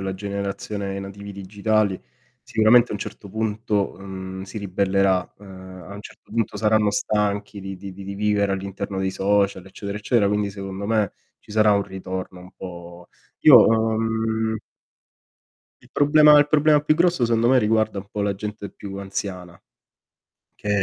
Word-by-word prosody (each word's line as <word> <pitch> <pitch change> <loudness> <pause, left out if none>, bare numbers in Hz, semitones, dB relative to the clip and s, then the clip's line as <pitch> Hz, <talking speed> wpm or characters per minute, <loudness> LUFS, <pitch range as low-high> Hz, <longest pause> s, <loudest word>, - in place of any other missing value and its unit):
la 95 -1 -3
generazione 100 0 -4
i 100 - -4
nativi 100 +1 -8
digitali, 100 +1 0 0.4
sicuramente 115 +2 +4
a - - -3
un 105 - -4
certo 105 -1 -8
punto, 110 -1 -1
mhmm, 95 -1 -7
si 100 +3 -7
ribellerà, 95 -1 0
uhm, 105 - -14 0.4
a 100 - -9
un 100 - -8
certo - - -15
punto 115 -2 -1
saranno 105 -1 +2
stanchi 105 -1 -1
di 95 0 -6
di 100 0 -9
di 100 +1 -8
vivere 100 -1 +1
all'interno 95 0 -4
dei 95 0 0
social 100 -1 0
eccetera, 100 +2 -6
eccetera, 105 -1 +2
quindi 105 0 0
secondo 95 0 -6
me, 110 -2 +1 0.3
ci - - -19
sarà 105 0 +4
un 100 0 +2
ritorno 95 -1 -6
un 90 0 -14
po' 85 -1 -10 0.3
Io, 145 -5 +9
uhm 110 0 0 1.3
Il - - -21
problema 150 +1 +6
il 145 - +5
problema 150 0 +4
più 150 +1 +2
grosso 170 -5 +2
secondo 115 0 +2
me, 130 - +5
riguarda 110 -2 +1
un 100 - -7
po' 105 0 -5
la 100 -1 -1
gente 105 0 -6
più 100 -1 -8
anziana, 95 -3 -6 0.9
che 105 - -8
100 Hz, 160 wpm, -23 LUFS, 95-110 Hz, 1.3 s, Io